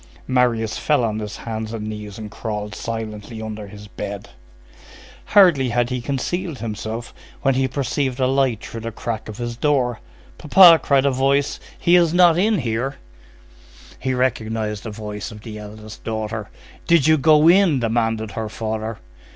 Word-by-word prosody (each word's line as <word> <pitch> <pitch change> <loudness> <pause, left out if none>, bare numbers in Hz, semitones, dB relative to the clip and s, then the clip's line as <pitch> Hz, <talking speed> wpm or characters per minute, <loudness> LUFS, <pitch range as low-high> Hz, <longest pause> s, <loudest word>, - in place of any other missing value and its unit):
Marius 120 -4 +1
fell 150 -5 +2
on 110 -1 -1
his 105 -1 -6
hands 110 -1 -5
and 110 -2 -4
knees 105 -2 -7
and 105 -2 -8
crawled 105 -2 -5
silently 110 0 -6
under 110 -1 -6
his 105 +1 -11
bed. 100 -1 -7 0.9
Hardly 175 -11 +5
had 120 +1 0
he 125 -1 -2
concealed 145 +5 -3
himself, 110 +1 -5 0.3
when 135 -1 +3
he 130 +1 +1
perceived 135 0 -2
a 130 - +3
light 130 -4 +1
through 115 - -7
the 115 +1 -5
crack 110 0 -5
of 105 - -8
his 120 -1 -4
door. 125 -3 +1 0.4
"P'pa," 170 +1 +8
cried 140 -1 +2
a 140 - +3
voice, 135 +2 +1 0.2
"he 175 - +3
is 170 -1 +4
not 175 -2 +6
in 210 +4 +2
here." 125 0 -2 1.0
He 130 -1 -1
recognized 110 -4 -1
the 110 - -6
voice 105 +1 -6
of 105 -1 -11
the 105 -1 -8
eldest 105 +1 -10
daughter. 110 -1 -4 0.4
"Did 170 -5 +4
you 155 -1 +4
go 155 +2 +5
in?" 175 -5 +5
demanded 115 -2 -1
her 110 -1 -4
father. 110 0 -4
115 Hz, 165 wpm, -21 LUFS, 110-135 Hz, 1.0 s, P'pa